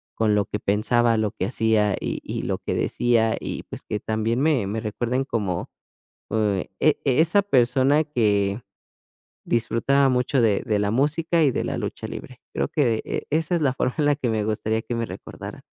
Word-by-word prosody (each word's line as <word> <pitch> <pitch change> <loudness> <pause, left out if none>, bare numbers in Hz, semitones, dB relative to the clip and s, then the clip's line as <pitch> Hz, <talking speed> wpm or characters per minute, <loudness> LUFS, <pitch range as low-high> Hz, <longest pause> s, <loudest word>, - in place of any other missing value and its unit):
con 110 -2 +2
lo 105 -1 +2
que 105 - -4
pensaba, 115 +3 +2
lo 110 -2 0
que 95 - -3
hacía 110 -3 +2
y - - -3
y - - -4
lo - - -2
que - - -3
decía 115 -2 +1
y - - -5
pues, - - -9
que 105 - -3
también 110 +3 -1
me 140 -9 +2
me 105 +3 -2
recuerden 120 +4 -2
como 100 -9 -2 0.6
eh, 105 -3 0
e 155 - +3
e 130 -1 +2
esa 170 +5 +4
persona 135 -3 +3
que 105 -6 +1 0.8
disfrutaba 120 +4 +2
mucho 125 +1 +1
de 105 -3 +2
de 105 -3 +1
la 100 0 0
música 155 +7 +1
y 140 - +4
de - - -2
la - - -3
lucha - - -4
libre. - - -9
Creo 70 +1 -1
que 120 -7 +1
e - - -3
esa 160 +3 0
es 170 - +1
la 135 -3 +2
forma 125 -1 -1
en 150 - +2
la 145 - +3
que 135 -4 -2
me 110 -2 0
gustaría 110 +1 -1
que 120 - -4
me 115 -1 -2
recordaran. - - -9
115 Hz, 200 wpm, -24 LUFS, 105-135 Hz, 0.8 s, esa